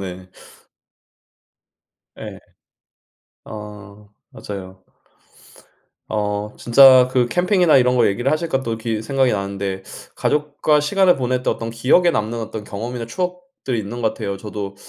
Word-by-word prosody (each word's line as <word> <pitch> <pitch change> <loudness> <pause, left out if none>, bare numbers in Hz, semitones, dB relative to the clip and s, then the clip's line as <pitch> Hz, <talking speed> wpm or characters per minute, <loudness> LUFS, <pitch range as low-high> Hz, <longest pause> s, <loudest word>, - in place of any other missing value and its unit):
네. 95 -1 -8 1.9
예. - - -8 1.1
어. 105 -1 -11 0.2
맞아요. 95 -2 -9 1.2
어 105 0 -3
진짜 130 +1 +7
그 125 -1 +2
캠핑이나 180 - +3
이런 125 -1 +3
거 125 - +4
얘기를 120 +7 0
하시니까 155 -4 -1
또 115 -3 -3
기 110 -1 -3
생각이 130 +2 +1
나는데 100 -1 -3 0.3
가족과 150 0 +1
시간을 185 +4 +3
보낼 125 -1 -1
때 - - +1
어떤 115 0 -4
기억에 130 +10 +3
남는 115 -4 -2
어떤 110 -1 -6
경험이나 115 +4 -5
추억들이 180 -4 -4
있는 115 +3 -5
것 110 - +3
같아요. 100 -3 -5
저도 100 0 -6
115 Hz, 265 characters per minute, -20 LUFS, 105-135 Hz, 1.9 s, 진짜